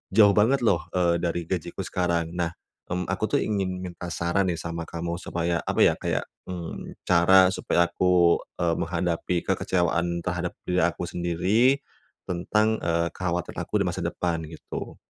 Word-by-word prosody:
jauh 105 -2 +8
banget 125 +6 +4
loh, 95 -7 +4 0.2
eee, 85 -1 +3
dari 85 0 -1
gajiku 90 -5 -3
sekarang. 85 -2 -1
Nah, 85 -1 -1 0.4
mmm, 90 0 -1
aku - - -3
tuh - - +2
ingin 95 -3 -2
minta 90 -1 -7
saran 85 +3 +1
nih 85 - 0
sama 85 0 -4
kamu 85 0 -4
supaya, 85 0 -1
apa - - +1
ya, - - +5
kayak, - - -1 0.3
mmm, 85 -2 -6
cara 90 +2 +6
supaya 85 0 +1
aku, 90 -2 +4 0.2
eee, 85 -1 +2
menghadapi 85 +1 -1
kekecewaan 85 -1 0
terhadap 90 -1 -2
diri 90 0 +1
aku 85 +1 0
sendiri, 95 +10 +2 0.5
tentang, 105 +5 +1
eee, 85 0 0
kekhawatiran 90 -1 -3
aku - - -4
di - - +1
masa - - -4
depan 85 -2 -1
gitu. 80 0 -7
85 Hz, 160 wpm, -26 LUFS, 85-90 Hz, 0.5 s, jauh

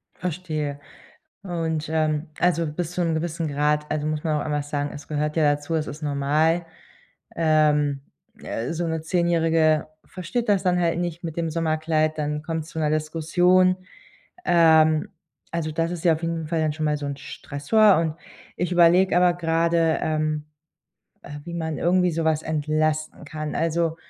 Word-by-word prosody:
Verstehe 155 -5 -4 0.6
und, 165 -4 -2
ähm, 155 -1 0
also 170 -2 +2
bis 165 +2 -4
zu 180 0 -1
‘nem 165 -1 0
gewissen 165 0 -2
Grad 150 +1 0
also 155 0 -1
muss 155 -1 -2
man 155 -2 0
auch - - -4
einmal 150 -1 -1
sagen, 145 0 -3
es 145 -1 -10
gehört 150 +1 -2
ja 150 -2 +4
dazu, 145 +3 -4
es 155 -1 -1
ist 150 +2 -8
normal, 150 +4 +1 0.7
ähm, 150 -3 +2 0.4
äh, 115 +7 -4
so 170 0 -2
‘ne 160 -1 -2
10 170 +1 0
Jährige 160 -2 +2 0.2
versteht 190 +6 -4
das 195 -2 +3
dann 180 -1 +2
halt 170 -1 +1
nicht 175 -1 -4
mit 165 -1 -5
dem 165 -1 -1
Sommerkleid, 155 -1 0
dann 150 0 -2
kommt's 160 -1 -4
zu 160 - -6
‘ner 150 -1 +1
Diskussion. 175 +4 +2 0.7
Ähm, 160 -2 +4 0.4
also 165 -2 -2
das 165 +2 -1
ist 175 -2 -5
ja 165 - +6
auf 160 - -4
jeden 165 -1 -3
Fall 160 0 0
dann 155 -1 0
schon 155 0 -3
mal 150 0 +1
so 145 - -5
‘n 140 -1 -4
Stressor 190 +10 +2
und 160 -2 -1 0.4
ich 180 0 -1
überlege 175 +1 +5
aber 180 -1 +4
gerade, 165 -1 +1
ähm, 155 -1 -1 0.8
äh, - - -10
wie 170 0 -7
man 160 -3 -3
irgendwie 180 0 +2
sowas 160 -1 0
entlasten 155 +1 -1
kann. 155 0 -5
Also, 165 0 0
160 Hz, 170 wpm, -24 LUFS, 150-170 Hz, 0.8 s, ja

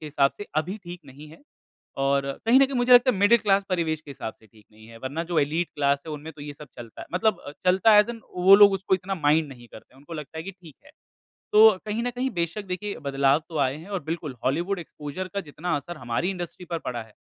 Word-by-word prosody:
के 155 - -8
हिसाब 140 -2 +2
से 205 - -8
अभी 175 +6 -1
ठीक 175 0 -8
नहीं 145 +3 -13
है 160 - -16 0.6
और 140 0 +2 0.2
कहीं 250 +4 +6
न 275 - +6
कहीं 270 0 -5
मुझे 245 +1 +4
लगता 245 +1 +7
है, - - -4
मिडिल 205 +4 +5
क्लास 200 -2 +2
परिवेश 160 -4 -1
के 145 - -11
हिसाब 110 -4 -6
से 110 - -21
ठीक 105 +1 -22
नहीं 110 +1 -17
है। 115 0 -13
वरना 145 +6 -3
जो 170 -2 0
एलीट 155 +4 0
क्लास 140 -1 +1
है, - - -5
उनमें 150 +2 -8
तो 145 - -13
ये 145 0 -7
सब 150 +1 -12
चलता 115 -2 -10
मतलब 215 +4 +1
अ, - - -6
चलता 185 +4 +4
है 210 - +8
ऐज़ 210 - +2
इन 230 -1 -10
वो 185 +2 +7
लोग 200 0 +8
उसको 190 0 -1
इतना 190 +2 -4
माइंड 155 -1 +2
नहीं 120 -3 -13
करते, 115 +3 -15
उनको 145 +5 -11
लगता 155 0 -8
है 160 - -5
कि 195 - -6
ठीक 180 -6 -16
है। - - -17 0.6
तो 220 +1 +9 0.2
कहीं 215 +2 -2
न 245 - -1
कहीं 250 +2 -2
बेशक, 170 +3 -3
देखिए, 195 +2 -4
बदलाव 140 +1 +2
तो 160 - -5
आए 135 -1 +1
हैं 165 +6 -12
और 195 -6 -4
बिल्कुल, 155 -3 -5
हॉलीवुड 175 +8 0
एक्सपोज़र 160 +2 -7
का 200 - -1
जितना 175 +1 -4
असर 155 +4 -6
हमारी 120 +8 -2
इंडस्ट्री 180 -1 -6
पर 170 - -2
पड़ा 120 -2 -3
है, 110 -1 -15
165 Hz, 255 wpm, -25 LUFS, 140-195 Hz, 0.6 s, तो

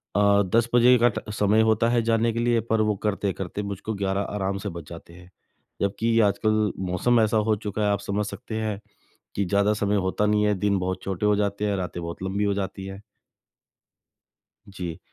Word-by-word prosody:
अ, 100 0 +4
10 115 0 +3
बजे 125 +1 +6
का 120 - +7
ट - - -6
समय 105 +1 +3
होता 115 +1 +2
है 120 -1 +2
जाने 115 0 +2
के 115 - -2
लिए 120 0 +2
पर 110 - +3
वो 105 -1 +1
करते-करते 100 -2 -2
मुझको 100 +2 -4
11 100 -1 -1
आराम 100 -1 -2
से 100 +1 -5
बज 85 -3 -8
जाते 85 0 -11
हैं। 90 +1 -15 0.5
जबकि 115 +4 +1
आजकल 105 +1 +2 0.2
मौसम 115 +7 +2
ऐसा 110 0 +2
हो 110 0 +2
चुका 105 0 -4
है 105 - +2
आप 100 - 0
समझ 100 +1 -2
सकते 100 +2 -7
हैं 105 -2 -2 0.6
कि 100 - 0
ज़्यादा 100 +3 +2
समय 105 0 0
होता 105 +3 0
नहीं 105 0 +2
है 105 - +3
दिन 100 0 +1
बहुत 95 +1 -3
छोटे 95 +1 -2
हो 105 0 +4
जाते 100 0 -1
हैं 100 - 0
रातें 90 -1 -4
बहुत 85 +2 -6
लंबी 95 +2 -1
हो 100 -1 +1
जाती 95 -1 -4
है। 95 +1 -8 1.7
जी। 90 -4 -6
100 Hz, 200 wpm, -25 LUFS, 95-110 Hz, 1.7 s, का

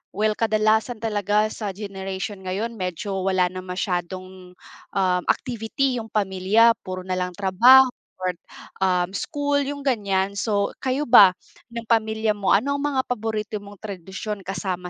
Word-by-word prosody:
well, 215 +1 +1
kadalasan 220 +1 +1
talaga 210 0 +1
sa 210 -2 -4
generation 195 0 -5
ngayon 200 +5 -3
medyo 190 +2 -3
wala 185 -1 +1
na 185 - -5
masyadong, 185 0 -5 0.4
um, 185 -2 +2
activity 250 +1 -1
yung 220 - -9
pamilya. 205 +3 +3
Puro 185 0 -6
nalang 180 -1 -2
trabaho 245 +7 +6 0.3
or, 185 -1 -2 0.5
um, 180 -1 +1
school, 285 +6 -1
yung 285 0 -4
ganyan. 200 -6 0
So 200 0 0
kayo 265 +2 0
ba, 205 -7 +8 0.3
ng 235 0 -6
pamilya 220 -1 +1
mo, 200 -2 -2
ano 265 +8 +1
ang - - -4
mga 280 -2 +1
paborito 220 -2 -3
mong 205 0 -12
tradisyon 200 +1 -6
kasama 185 -2 -3
205 Hz, 140 wpm, -23 LUFS, 185-225 Hz, 0.5 s, ba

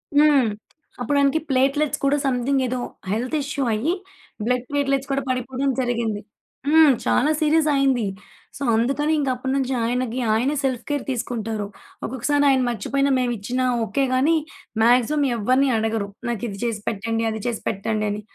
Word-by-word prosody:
హ్మ్. 290 -4 +5 0.5
అప్పుడు 285 +3 +1
ఆయనకి 280 +3 +3
ప్లేట్‌లెట్స్ 275 +2 +1
కూడా 275 +1 +3
సమ్‌థింగ్ 265 +1 +1
ఏదో 250 +1 -2 0.3
హెల్త్ 245 +8 -1
ఇష్యూ 280 0 -2
అయ్యి 255 +11 0 0.5
బ్లడ్ 250 +1 0
ప్లేట్‌లెట్స్ 275 -1 0
కూడా 275 0 +1
పడిపోడం 255 +2 -1
జరిగింది. 235 -4 -1 0.5
హ్మ్. 310 -1 +6
చాలా 295 +4 +3
సీరియస్ 310 0 +3
అయింది. 265 -5 +2 0.5
సో, - - -15
అందుకని 275 +7 +1
ఇంక 275 - 0
అప్పటినుంచి 265 +1 -1
ఆయనకి 250 +1 -1
ఆయనే 255 +7 +1
సెల్ఫ్‌కేర్ 265 +2 -1
తీసుకుంటారు. 225 -4 -3 0.4
ఒక్కొక్కసారి 285 +4 0
ఆయన 265 -1 +3
మర్చిపోయిన 275 +4 0
మేము 245 -1 0
ఇచ్చిన 245 +6 -3 0.2
ఓకే. 275 +5 0
గాని 295 +6 +3 0.5
మ్యాగ్జిమం 250 +5 +3
ఎవరన్నీ 255 +5 +2
అడగరు. 220 -2 -1 0.2
నాకు 235 -3 -3
ఇది 195 -1 -8
చేసి 225 -3 -2
పెట్టండి 225 +2 -2
అది 220 -1 -5
చేసి 235 -3 -2
పెట్టండి 215 +2 -2
అని, 210 +1 -4
255 Hz, 145 wpm, -23 LUFS, 230-280 Hz, 0.5 s, హ్మ్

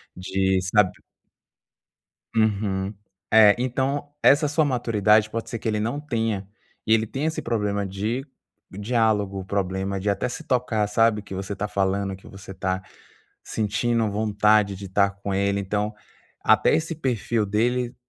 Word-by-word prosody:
de 95 +1 0
sabe 95 0 +3 1.4
Uhum, 100 -3 0 0.4
eh, 105 -2 +7
então 135 +3 -1
essa 145 +2 +5
sua 150 +2 +2
maturidade 110 -5 +2
pode 115 +1 -5
ser 115 - -3
que 110 - -4
ele 105 -1 0
não 120 +7 -2
tenha, 115 -8 -2 0.4
e 110 - +5
ele 110 0 +1
tenha 135 +7 -3
esse 160 - -4
problema 105 -3 -1
de 110 +8 -3 0.4
diálogo, 105 -2 0
o - - -7
problema 95 0 -2
de 100 - -2
até 100 +2 0
se - - -6
tocar 120 -5 0
sabe, 115 0 +3
o - - -14
que 100 - -9
você 95 +2 -4
tá 105 +2 -3
falando, 100 -1 -1
que 95 - -18
você 95 -1 -10
está 95 0 -2 0.6
sentindo 115 +1 0
vontade 105 -1 +2
de 100 +1 -8
estar 100 +1 +2
com 100 0 -5
ele, 100 +1 +1
então 105 +2 -2 0.5
até - - +4
esse 160 +2 -1
perfil 120 -6 -1
dele 120 +4 0
105 Hz, 155 wpm, -24 LUFS, 100-115 Hz, 1.4 s, eh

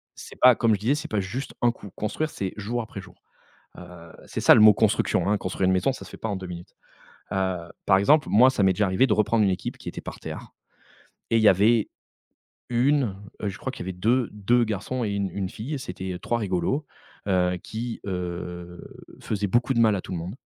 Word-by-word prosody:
c'est - - -11
pas, 125 -1 +7
comme 115 -1 +2
je 100 - 0
disais, 120 +8 +1
c'est 150 - -6
pas 105 - 0
juste 110 +8 -5
un 120 -1 +4
coup. 105 - -12
Construire, 155 +9 -2
c'est 95 -10 -4
jour 115 +4 -3
après 110 - -8
jour, - - -15 0.6
heu, 90 -2 -12
c'est - - -4
ça - - +7
le - - +5
mot 110 0 +9
construction, - - +1
hein, 105 - +3
construire 95 0 -2
une 95 - +3
maison 95 +8 +2
ça - - -9
se - - -13
fait - - -9
pas 110 - -5
en 100 - -2
2 95 -1 -7
minutes, 85 -1 -9 0.6
heu, 95 -1 0 0.3
par 95 -1 +5
exemple, 145 +10 +3
moi, 125 +5 +6
ça 115 -6 0
m'est 95 -1 +4
déjà 105 +2 +1
arrivé 95 +8 +3
de 110 - +2
reprendre 105 +1 +2
une 100 - +3
équipe 90 -2 -3
qui - - -7
était - - -8
par - - -8
terre - - -8 0.8
et 115 - +3
il - - +2
y 110 - +7
avait 105 +4 +4 0.8
1, 125 -2 +2 0.3
heu, 105 - -2
je 95 - -8
crois - - -4
qu'il - - -8
y - - -4
avait - - -4
deux-deux 115 +1 +1
garçons 110 +4 -3
et 105 - -2
une-une 100 -1 -2
fille 120 +10 -6
et - - -2
c'était, 95 -6 -6
heu, 90 - -7
3 120 - -1
rigolos, 100 - -1 0.4
heu, 90 -2 +2
qui, 115 +1 -5
heu, 90 -2 -5 0.4
faisaient 105 -1 -2
beaucoup 120 +6 +1
de 115 - 0
mal 110 -3 +4
à 95 - -3
tout - - -10
le 90 - -2
monde 90 +7 -6
105 Hz, 235 wpm, -25 LUFS, 95-120 Hz, 0.8 s, mot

